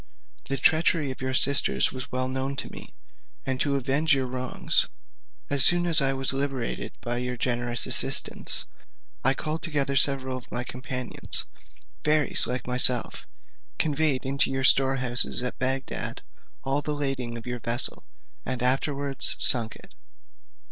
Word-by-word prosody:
The 135 Hz, -, -3 dB
treachery 160 Hz, -3 st, +1 dB
of 130 Hz, -, -10 dB
your 130 Hz, 0 st, -3 dB
sisters 140 Hz, +1 st, +3 dB
was 130 Hz, -1 st, -8 dB
well 130 Hz, 0 st, -2 dB
known 130 Hz, +1 st, -4 dB
to -, -, -6 dB
me, -, -, -11 dB, 0.5 s
and 130 Hz, -1 st, -3 dB
to 140 Hz, -1 st, 0 dB
avenge 140 Hz, +4 st, +1 dB
your 135 Hz, -1 st, -2 dB
wrongs, 130 Hz, 0 st, -1 dB, 0.6 s
as 140 Hz, -2 st, +4 dB
soon 175 Hz, +3 st, +4 dB
as 165 Hz, -4 st, +8 dB
I 135 Hz, 0 st, +1 dB
was 135 Hz, 0 st, +1 dB
liberated 135 Hz, -3 st, -4 dB
by 120 Hz, 0 st, -4 dB
your 125 Hz, 0 st, -5 dB
generous 120 Hz, -1 st, -1 dB
assistance, -, -, 0 dB, 0.6 s
I 135 Hz, +1 st, +3 dB
called 155 Hz, +3 st, -4 dB
together 140 Hz, -4 st, -2 dB
several 135 Hz, -1 st, +1 dB
of 125 Hz, -, -13 dB
my 120 Hz, -, -3 dB
companions, 125 Hz, 0 st, -4 dB, 0.6 s
fairies 150 Hz, -1 st, +6 dB
like 125 Hz, +1 st, -4 dB
myself, 125 Hz, -1 st, +4 dB, 0.5 s
conveyed 150 Hz, -3 st, 0 dB
into 140 Hz, +1 st, +1 dB
your 135 Hz, 0 st, -3 dB
storehouses 130 Hz, -2 st, +3 dB
at 125 Hz, -, -4 dB
Bagdad 130 Hz, +1 st, -3 dB, 0.4 s
all 135 Hz, +2 st, -1 dB
the 150 Hz, +1 st, -4 dB
lading 135 Hz, -5 st, -4 dB
of 115 Hz, -, -11 dB
your 125 Hz, 0 st, -5 dB
vessel, 115 Hz, +2 st, -1 dB, 0.4 s
and 125 Hz, -1 st, -5 dB
afterwards 140 Hz, +1 st, -1 dB
sunk 115 Hz, -3 st, +3 dB
it. -, -, -17 dB
135 Hz, 150 wpm, -25 LUFS, 125-140 Hz, 0.6 s, as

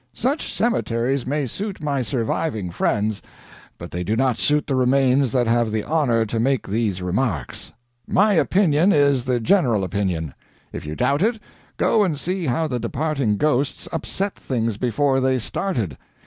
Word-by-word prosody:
Such 270 Hz, +6 st, -1 dB
cemeteries 135 Hz, -, 0 dB
may 145 Hz, +1 st, 0 dB
suit 200 Hz, -, -5 dB
my 145 Hz, -3 st, -1 dB
surviving 115 Hz, -, -2 dB
friends, 105 Hz, +3 st, 0 dB, 0.6 s
but 85 Hz, -, -9 dB
they 90 Hz, +1 st, -3 dB
do 105 Hz, +5 st, 0 dB
not 130 Hz, -1 st, +1 dB
suit 150 Hz, 0 st, +2 dB
the 140 Hz, -, -2 dB
remains 130 Hz, 0 st, +3 dB
that 125 Hz, -1 st, +2 dB
have 115 Hz, -1 st, +1 dB
the 110 Hz, -1 st, -1 dB
honor 130 Hz, -8 st, +1 dB
to 110 Hz, +1 st, -3 dB
make 130 Hz, +2 st, 0 dB
these 100 Hz, -3 st, -1 dB
remarks. 95 Hz, -, -2 dB, 0.4 s
My 205 Hz, +2 st, +3 dB
opinion 180 Hz, 0 st, +3 dB
is 140 Hz, -4 st, +3 dB
the 125 Hz, -1 st, +1 dB
general 120 Hz, -, +2 dB
opinion. 90 Hz, -6 st, -2 dB, 0.4 s
If -, -, -6 dB
you 75 Hz, -, -4 dB
doubt 140 Hz, -, +1 dB
it, 225 Hz, +2 st, +1 dB, 0.4 s
go 220 Hz, -, +3 dB
and 170 Hz, -7 st, 0 dB
see 180 Hz, +3 st, -3 dB
how 145 Hz, +6 st, 0 dB
the 125 Hz, -4 st, -2 dB
departing 140 Hz, -6 st, -1 dB
ghosts 145 Hz, 0 st, 0 dB
upset 200 Hz, +1 st, -2 dB
things 115 Hz, -5 st, -2 dB
before 135 Hz, +4 st, +1 dB
they 130 Hz, 0 st, +2 dB
started. 115 Hz, -, -3 dB
130 Hz, 160 wpm, -22 LUFS, 110-150 Hz, 0.6 s, remains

